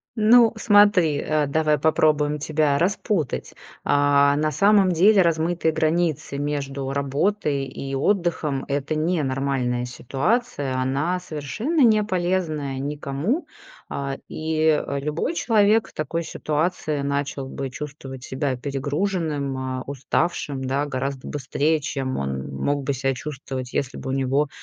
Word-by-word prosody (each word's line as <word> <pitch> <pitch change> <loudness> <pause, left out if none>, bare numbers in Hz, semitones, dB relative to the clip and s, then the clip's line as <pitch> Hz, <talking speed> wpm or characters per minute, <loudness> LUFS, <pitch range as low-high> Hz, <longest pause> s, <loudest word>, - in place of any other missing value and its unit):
Ну, 230 +1 +6
смотри, 205 -8 +5
э, 155 0 +1
давай 155 +1 +2
попробуем 150 0 +2
тебя 150 -1 +1
распутать. 180 - -1 0.3
А, 145 0 +4
на 155 0 +1
самом 200 +1 +4
деле 195 +4 +5
размытые 165 0 +1
границы 160 -2 0
между 140 -2 -3
работой 140 +2 0
и 135 +1 -6
отдыхом- 160 -3 0
это 140 +2 -1
не 160 +2 +1
нормальная 130 -3 -1
ситуация. 135 - -1
Она 140 +8 0
совершенно 180 - -2
не 215 -3 +5
полезная 175 -8 -1
никому. 145 - -2 0.4
А, 140 -1 -3
и, 155 -1 +1
э, 140 - -2
любой 150 - -2
человек 220 -4 +3
в - - -17
такой 155 +2 -2
ситуации 155 -1 -2
начал 140 -1 -2
бы 135 0 -5
чувствовать 135 0 -8
себя 130 0 -2
перегруженным, 145 +1 -2
а, 130 -1 -3
уставшим, 140 +1 -2
да, 135 +3 0
гораздо 135 0 -4
быстрее, 145 +2 0
чем 135 -3 -3
он 70 -1 -3
мог 140 - -1
бы 140 - 0
ся 135 +1 0
чувствовать, 130 -2 -6
если 135 -1 -2
бы - - -6
у - - -1
него, 135 +2 +1
145 Hz, 130 wpm, -23 LUFS, 135-170 Hz, 0.4 s, Ну